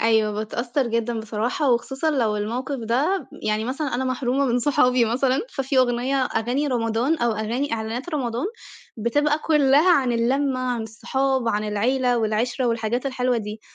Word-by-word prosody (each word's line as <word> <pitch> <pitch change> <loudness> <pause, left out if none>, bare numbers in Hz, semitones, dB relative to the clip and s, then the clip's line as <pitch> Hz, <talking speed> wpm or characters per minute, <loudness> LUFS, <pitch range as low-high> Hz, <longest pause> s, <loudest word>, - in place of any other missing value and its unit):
أيوَه 220 -1 +3
باتأثّر 240 +5 -2
جدًا 230 0 -1
بصراحة 225 +6 -1
وخصوصًا 265 +6 0
لو 230 -7 +1
الموقف 245 +7 -3
ده 270 - 0
يعني 215 +1 0
مثلًا 270 +2 -3
أنا 260 - -1
محرومة 255 +1 0
من 245 -1 +1
صحابي 250 -2 +3
مثلًا، 255 +4 +1
ففي 270 - -1
أغنية 250 +2 +2
أغاني 250 +4 -1
رمضان 240 +3 0
أو 235 -1 +1
أغاني 230 +6 -2
إعلانات 230 +6 -3
رمضان 245 0 -1 0.5
بتبقى 290 +7 +1
كلّها 300 +1 +4
عن 260 -6 +2
اللمّة، 255 +3 +1
عن 245 -2 -1
الصحاب، 260 +3 -1
عن 210 -1 0
العيلة 245 +4 +1
والعِشرة 230 +4 0
والحاجات 230 +2 -1
الحلوة 255 -2 0
دي، 215 0 -5
245 Hz, 155 wpm, -23 LUFS, 225-270 Hz, 0.5 s, كلّها